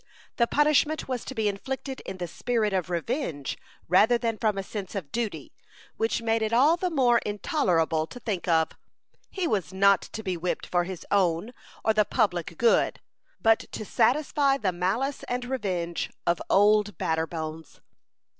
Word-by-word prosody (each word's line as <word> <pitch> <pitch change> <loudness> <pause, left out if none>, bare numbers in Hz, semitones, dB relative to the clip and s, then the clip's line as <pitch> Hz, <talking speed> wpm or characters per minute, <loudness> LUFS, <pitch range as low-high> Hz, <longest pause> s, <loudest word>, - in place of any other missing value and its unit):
The 235 - +3
punishment 300 +2 +2
was 255 -3 -3
to 265 - -6
be 220 -2 +1
inflicted 265 +6 -4
in 190 - -5
the 175 -1 -4
spirit 220 +3 -1
of 185 -2 -1
revenge 170 - -2 0.3
rather 215 +7 +5
than 230 -2 -2
from 215 -3 +1
a 195 - -2
sense 200 0 -6
of 165 -8 -5
duty, 230 -3 -3 0.4
which 225 +1 -1
made 225 0 +1
it 220 0 0
all 275 +8 +5
the 365 +1 -1
more 250 -7 +3
intolerable 180 - 0
to 245 - -10
think 200 -7 -3
of. 160 -2 +3 0.6
He 375 -2 -3
was 195 - -1
not 195 +1 +4
to 220 - -8
be 185 -2 -2
whipped 175 +1 -3
for 175 -1 0
his 185 -1 -7
own 190 +3 +1 0.3
or 220 - +4
the 215 0 +4
public 180 -7 -1
good, 235 -1 +3 0.4
but 225 0 +4
to 215 - -5
satisfy 275 +4 +2
the 200 -7 0
malice 205 +11 -1
and 245 0 -2
revenge 185 -10 -2 0.2
of 170 0 +1
"Old 210 0 +4
Batterbones." 160 -1 -3
210 Hz, 165 wpm, -27 LUFS, 180-245 Hz, 0.6 s, rather